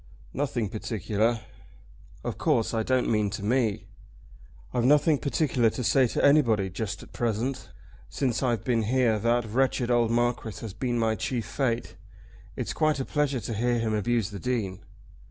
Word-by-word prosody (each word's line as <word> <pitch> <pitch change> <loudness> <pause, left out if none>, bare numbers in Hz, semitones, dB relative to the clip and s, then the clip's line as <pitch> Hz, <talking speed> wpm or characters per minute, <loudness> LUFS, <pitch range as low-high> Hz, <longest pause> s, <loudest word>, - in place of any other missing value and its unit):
"Nothing 120 -6 -1
particular." 110 +2 -1 0.8
"Of - - -4
course 115 - +1
I 115 - +1
don't 130 +2 +1
mean 105 -2 +1
to 100 +1 -6
me." 115 -2 +1 0.9
"I've 120 - +1
nothing 145 +2 +4
particular 135 -5 +1
to 125 - -5
say 130 +2 +4
to - - 0
anybody 115 -10 +4
just 105 +3 -4
at - - -16
present. 120 +3 -2 0.4
Since 125 -5 -1
I've 120 -5 0
been 120 -3 +1
here 115 -1 +2
that 120 +2 +1
wretched 125 +2 0
old 120 -2 +3
Marquis 115 -3 0
has 110 -4 -6
been 120 +2 -2
my 115 -1 +2
chief 115 0 -2
fate. 120 -1 -2 0.6
It's - - -3
quite 155 -2 +1
a 135 - -2
pleasure 145 -4 0
to 115 - -4
hear 120 +3 +1
him 115 -1 -1
abuse 110 0 0
the 100 - -6
Dean." 100 -4 -2
120 Hz, 165 wpm, -27 LUFS, 110-130 Hz, 0.9 s, nothing